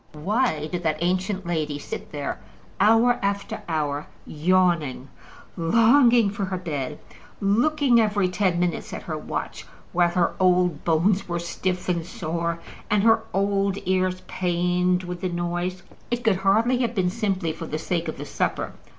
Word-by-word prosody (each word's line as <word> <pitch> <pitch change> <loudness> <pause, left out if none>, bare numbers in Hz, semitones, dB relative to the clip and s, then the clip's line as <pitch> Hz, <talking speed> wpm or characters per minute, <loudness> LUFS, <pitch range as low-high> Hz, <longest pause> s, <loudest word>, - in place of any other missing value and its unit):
Why 165 - 0
did 175 +2 -4
that 155 -3 0
ancient 185 +2 0
lady 155 -4 -1
sit 145 - -7
there 145 -2 -4 0.4
hour 225 +4 +4
after 200 0 -2
hour 150 -2 -1 0.2
yawning, 160 -5 +1 0.5
longing 230 +5 +4
for 200 -1 -3
her 185 0 -3
bed, 150 -5 -4 0.4
looking 245 +5 +3
every 205 -3 +2
ten 180 -1 0
minutes 175 -1 -2
at - - -6
her 160 - -4
watch, 155 - -5 0.3
while 175 0 +3
her 175 0 +1
old 180 -4 +2
bones 175 +5 +2
were 170 - -1
stiff 180 +2 -3
and 170 -2 0
sore, 170 -1 -3 0.3
and 210 -1 +2
her 225 0 +5
old 195 0 +1
ears 185 0 +1
pained 180 0 0
with 180 -1 -6
the 185 - -1
noise? 175 +1 -3 0.3
It 240 0 -2
could 220 -6 +3
hardly 220 +6 +2
have 240 -1 -1
been 180 -3 +1
simply 195 -6 -1
for 165 +1 -7
the 155 - -3
sake 170 +1 -2
of - - -4
the - - -6
supper. - - -2
180 Hz, 160 wpm, -24 LUFS, 170-200 Hz, 0.5 s, her